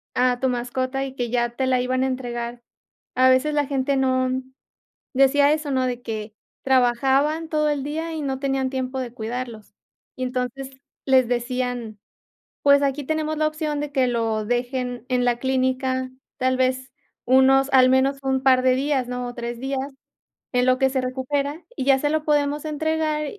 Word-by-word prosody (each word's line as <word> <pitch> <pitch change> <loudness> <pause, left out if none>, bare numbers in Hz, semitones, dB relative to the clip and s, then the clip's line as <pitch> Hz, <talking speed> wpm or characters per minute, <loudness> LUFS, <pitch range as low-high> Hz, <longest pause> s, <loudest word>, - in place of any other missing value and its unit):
a 250 0 +2
tu 260 - +1
mascota 255 +2 -2
y 265 - -8
que 245 -3 -2
ya 240 -1 +1
te 265 - 0
la 255 -1 +2
iban 255 +1 0
a - - +1
entregar, 240 -2 -4 0.5
a 255 +1 +5
veces 260 +4 +3
la 290 -2 +1
gente 275 0 0
no, 255 -1 +1 0.8
decía 280 +2 +4
eso, 305 -2 -4
¿no?, 260 -1 +1
de 245 -1 -3
que 215 -2 -5 0.3
trabajaban 270 +5 +2
todo 305 -1 +1
el 285 -2 -1
día 320 +3 -3
y 315 - -4
no 270 -2 -2
tenían 270 -1 0
tiempo 260 0 -3
de 245 -2 -6
cuidarlos. 230 -2 -6 0.4
Y 255 - -3
entonces, 255 +1 -3 0.4
les 260 -3 +4
decían: 245 -3 -2 0.7
"Pues 280 0 +6
aquí 280 0 -1
tenemos 310 0 -1
la 310 0 +2
opción 305 -1 -3
de 295 -1 -4
que 260 -3 +2
lo 225 -2 0
dejen 245 0 -2
en 250 -1 +1
la 240 -1 +1
clínica 260 0 0 0.3
tal 255 0 +1
vez 260 0 0 0.3
unos 265 +2 +5
al 255 -1 +6
menos 265 +2 +3
un 265 0 0
par 260 -1 +5
de 255 0 +4
días, 270 -2 0
¿no? 250 0 -4
O 245 - -6
3 235 0 -5
días 270 0 -2 0.7
en 250 0 +2
lo 255 0 +3
que 265 - +3
se 260 0 -1
recupera, 280 +5 -3
y - - -3
ya 270 -1 +4
se 290 - 0
lo 310 0 0
podemos 295 -1 +1
entregar 310 0 -1
260 Hz, 180 wpm, -23 LUFS, 250-280 Hz, 0.8 s, Pues